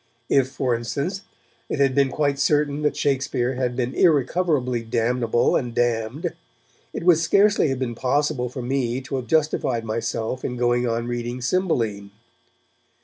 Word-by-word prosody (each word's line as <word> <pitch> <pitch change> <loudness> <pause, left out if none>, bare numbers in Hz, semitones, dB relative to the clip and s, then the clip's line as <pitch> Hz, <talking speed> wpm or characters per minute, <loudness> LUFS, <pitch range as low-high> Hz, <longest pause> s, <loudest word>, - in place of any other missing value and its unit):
If, 135 -2 +3
for 130 -2 -1
instance, 140 +11 -3 0.5
it - - -2
had 135 -2 +3
been 140 0 +3
quite 140 0 0
certain 145 0 +1
that 150 - 0
Shakespeare 130 -2 0
had 125 -1 -2
been 125 0 -2
irrecoverably 145 -5 +2
damnable 120 +1 +1
and 120 -2 -2
damned, 120 +7 -1 0.6
it - - -5
would 170 -2 +5
scarcely 200 +1 +3
have 135 -2 -1
been 125 -2 -2
possible 130 +1 0
for 130 0 -6
me 125 -1 -1
to 135 +1 -4
have 125 -2 -5
justified 145 -7 +1
myself 115 +2 -3
in 125 - -3
going 120 0 +1
on 115 0 -1
reading 120 +1 -4
Cymbeline. 120 - -1
130 Hz, 150 wpm, -23 LUFS, 120-145 Hz, 0.6 s, would